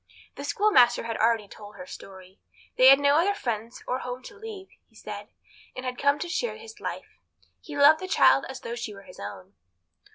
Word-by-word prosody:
The - - -7
schoolmaster 390 - +4
had 230 -1 -4
already 225 -2 +2
told 205 0 -12
her 180 -2 -9
story. 190 0 -12 0.4
They 255 - +6
had 270 +1 +9
no 285 +1 +4
other 395 +5 +2
friends 230 - -4
or 255 - -1
home 250 0 -6
to 415 - -11
leave, 415 -3 -9 0.2
he - - -29
said, - - -8 0.5
and 255 - -6
had 250 -1 -4
come 280 +1 +3
to 350 - -4
share 450 +8 -2
his 450 -1 -12
life. - - -7 0.4
He 295 -2 -9
loved 295 +2 +7
the 375 - -6
child 275 - +4
as 265 - -7
though 230 - -5
she 235 -3 -6
were 195 - -13
his 180 - -15
own. 100 -1 -9
255 Hz, 205 wpm, -26 LUFS, 215-335 Hz, 0.5 s, had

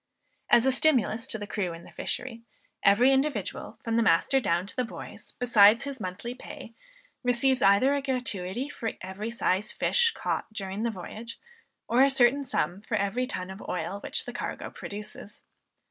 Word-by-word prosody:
As 235 - +6
a 265 - +4
stimulus 255 -5 +2
to - - -3
the 205 - -6
crew 195 -4 -2
in 165 +1 -10
the - - -14
fishery, 240 -2 -5 0.4
every 235 +7 +5
individual, 270 -6 -1
from 230 0 0
the - - +4
master 225 +7 +4
down 175 -6 0
to 195 - -7
the 255 - +1
boys, 230 - -9
besides 230 -2 +6
his 280 -2 -5
monthly 190 +6 -5
pay, 240 -2 -10 0.5
receives 250 +1 +2
either 200 +8 +5
a 285 - 0
gratuity 250 -4 -2
for 230 -6 -4
every 190 +4 -5
size 210 -3 0
fish 475 -1 +2
caught - - -3
during 195 -1 -4
the 235 - +1
voyage, 225 +3 -7 0.5
or 240 +3 +3
a 275 - +7
certain 270 +1 +3
sum 180 -5 -1
for 210 0 -2
every 210 +6 0
ton 185 -6 -4
of 190 - -9
oil 180 +3 -3
which - - -1
the - - -6
cargo - - -5
produces. 210 0 -8
230 Hz, 175 wpm, -28 LUFS, 200-255 Hz, 0.5 s, a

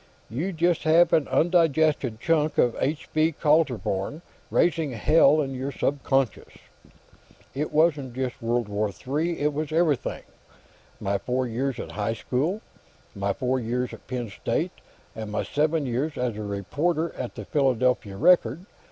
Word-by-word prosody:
You 160 +12 -2
just 170 0 +1
have 165 +2 +4
an 150 -4 +3
undigested 155 -8 +2
chunk 155 +1 +1
of 120 - +3
H. 150 +4 -1
V. 155 +1 +2
Kaltenborn 150 - +1 0.3
raising 160 -5 +1
hell 150 +5 +4
in 135 -2 -3
your 130 +2 -3
subconscious." 135 -4 -1 1.0
"It 145 +3 -3
wasn't 150 -5 +2
just 130 0 -3
World 120 0 0
War 105 +1 -1
III; 150 - -2
it 150 0 +1
was 155 +1 -3
everything. 160 -4 0 0.8
My 100 0 -1
four 130 +3 -1
years 125 +2 -2
at - - -6
high 110 +2 -2
school, 150 - -1 0.5
and 100 - -10
my 100 0 +1
four 130 +3 -1
years 125 +1 -2
at - - -12
Penn 120 -4 -4
State, - - -2 0.4
and 110 -1 -6
my 105 - -1
seven 155 0 0
years 135 +5 -2
as 125 -3 -1
a 110 - -5
reporter 145 - -1
on 125 - -4
the 105 - -7
Philadelphia 125 -7 +1
Record. 170 - +3
135 Hz, 150 wpm, -25 LUFS, 120-155 Hz, 1.0 s, have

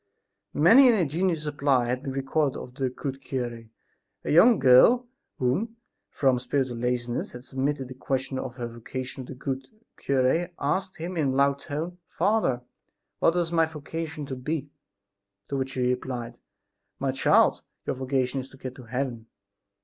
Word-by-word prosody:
Many 230 - +7
an 235 - +5
ingenious 170 -2 0
reply 140 -4 +2
has 125 +1 0
been 135 - -5
recorded 135 +1 0
of 125 - -8
the 130 0 -1
good 135 +1 -5
cure. 120 -3 -4 0.6
A - - -1
young 215 +9 +7
girl 180 - +6 0.3
who, 175 - 0 0.4
from 130 -3 +2
spiritual 130 -1 -1
laziness, 120 0 -2
had 125 0 -9
submitted 135 +1 -2
the 130 - -8
question 130 0 -2
of 120 - -5
her 120 -2 -4
vocation 125 +2 -7
to - - -7
the - - -14
good 135 0 -4 0.3
cure, 140 +6 +1
asked 185 +6 -1
him 175 +3 -5
in 150 -3 +2
a 130 - 0
loud 140 0 +3
tone: 165 +5 -5
"Father, 180 - +1 0.6
what 165 - +3
is 170 -1 0
my 165 -1 +3
vocation 155 0 -5
to 135 - -5
be?" 145 +2 -3 0.8
To - - -2
which 135 0 -2
he 130 - -2
replied: 125 -1 -2 0.6
"My 135 0 0
child, 130 - +4 0.2
your - - -1
vocation 130 0 -1
is 130 +1 -7
to 135 - -16
get 130 -1 -6
to 130 - -10
heaven." 120 -2 -3
135 Hz, 165 wpm, -27 LUFS, 125-155 Hz, 0.8 s, Many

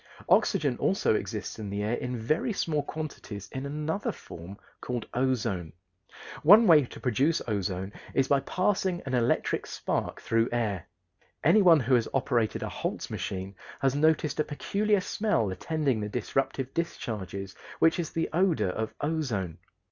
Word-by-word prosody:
Oxygen - - +3
also - - +2
exists - - -3
in 105 -2 -5
the 100 +1 -2
air 110 +3 0
in 125 0 -2
very 155 - 0
small 160 -7 0
quantities 140 -10 -6
in 135 +1 -4
another 155 +6 -2
form 85 +4 -10 0.2
called 120 -2 -3
ozone. 115 -10 0 0.7
One 205 +8 +8
way 155 -7 +7
to - - -11
produce 140 +6 +2
ozone 100 -2 -2 0.2
is 135 -1 +3
by 140 - +4
passing 185 +4 0
an 130 - -4
electric 120 -1 +1
spark - - -2
through 115 0 +1
air. 105 -7 -1 0.6
Anyone 175 -3 +6
who 125 +2 +1
has 120 -2 +4
operated 120 -4 +1
a - - -2
Holtz - - -4
machine 95 +1 -4 0.3
has 135 -2 +2
noticed 155 0 +2
a - - +4
peculiar 205 +7 0
smell 180 - 0
attending 140 - -1
the 105 0 -3
disruptive 130 +2 -2
discharges, 100 - -4 0.2
which 165 +2 +4
is 165 - -2
the 165 - -1
odor 175 - +2
of 110 +3 -4
ozone. 130 - -2
130 Hz, 150 wpm, -28 LUFS, 105-160 Hz, 0.7 s, One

